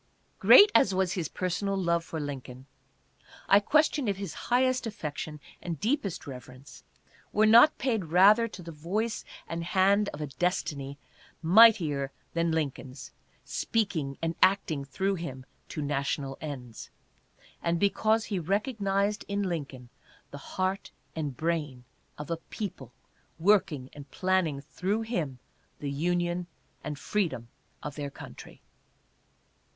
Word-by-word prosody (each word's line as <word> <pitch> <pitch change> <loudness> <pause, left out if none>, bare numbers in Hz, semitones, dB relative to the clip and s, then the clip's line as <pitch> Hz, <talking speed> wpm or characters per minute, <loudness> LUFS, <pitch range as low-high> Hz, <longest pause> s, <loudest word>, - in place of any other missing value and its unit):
Great 415 +1 +8
as 195 - +4
was 185 -1 +1
his 175 -5 -2
personal 190 +2 -2
love 170 -2 +1
for 165 -1 -5
Lincoln, 135 -3 -6 0.8
I 200 - +7
question 295 +3 +2
if 200 -2 0
his 195 -4 -5 0.2
highest 255 0 +2
affection 150 -6 -5 0.2
and 170 -4 -5
deepest 215 - -1
reverence 130 +1 -11 0.5
were 215 - +3
not 235 +8 +7
paid 225 -8 0
rather 200 +8 +5
to 195 -5 -10
the 165 - -8
voice 195 +9 -2 0.2
and 165 0 -4
hand 195 +3 +3
of 150 - -9
a 150 - -2
destiny 140 -2 -2 0.5
mightier 165 -8 +5 0.2
than 170 0 +1
Lincoln's 140 -4 -4 0.3
speak 220 -4 -1
ing 140 -3 -3
and 165 0 0
acting 185 -7 +3
through 190 +8 -1
him 135 -8 -6 0.2
to 150 - -4
national 140 -1 -2
ends, 130 -7 -7 0.7
and 170 0 0
because 215 +3 +2
he 200 -4 -2
recognized 200 - 0
in 200 0 -1
Lincoln 140 -9 -4 0.4
the 140 - -8 0.2
heart 190 +1 -1 0.3
and 145 -6 -4
brain 155 -6 -2 0.3
of 150 +2 -7
a 165 - 0
people 165 - -7 0.5
working 165 -7 +2
and 145 -1 -11
planning 185 -6 0
through 190 +9 -2
him 170 - -3 0.4
the 145 -1 -4
union 175 +3 -1 0.4
and 150 -1 -4
freedom 160 - -2 0.3
of 150 - -5
their 145 -1 -5
coun - - -10
try. - - -13
170 Hz, 135 wpm, -28 LUFS, 145-200 Hz, 0.8 s, Great